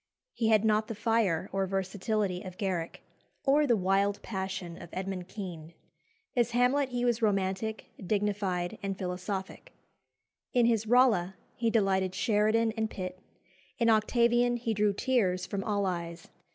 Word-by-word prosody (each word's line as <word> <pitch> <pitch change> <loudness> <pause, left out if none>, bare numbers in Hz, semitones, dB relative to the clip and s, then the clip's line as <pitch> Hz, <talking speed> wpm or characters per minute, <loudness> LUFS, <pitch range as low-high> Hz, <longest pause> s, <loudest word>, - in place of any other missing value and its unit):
He 225 - 0
had 220 -1 +4
not 215 0 +2
the 225 - -5
fire 210 -6 +1
or 195 0 0
versatility 195 0 -1
of 185 -1 -9
Garrick, 180 -5 -3 0.4
or 290 +2 +4
the 235 -3 +4
wild 195 +2 +1
passion 190 -4 -5
of 170 - -10
Edmund 185 -1 -4
Kean. 170 -5 -8 0.6
As 240 -1 +1
Hamlet 265 +3 +3
he 245 -1 -1
was 235 -1 +1
romantic, 200 +1 -1
dignified, 200 -1 -1
and 195 -1 -3
philosophic. 190 - -5 0.8
In 245 -2 +4
his 225 -2 +2
Rolla 220 -7 +4 0.2
he 230 -1 0
delighted 190 -4 +1
Sheridan 215 +2 +2
and 220 -1 -1
Pitt; 185 -2 -6 0.6
in 230 -1 +3
Octavian 240 +2 +3
he 230 -1 -2
drew 210 0 +2
tears 195 -6 +1
from 195 0 -3
all 205 -2 0
eyes. 170 -2 -4
205 Hz, 145 wpm, -30 LUFS, 185-230 Hz, 0.8 s, had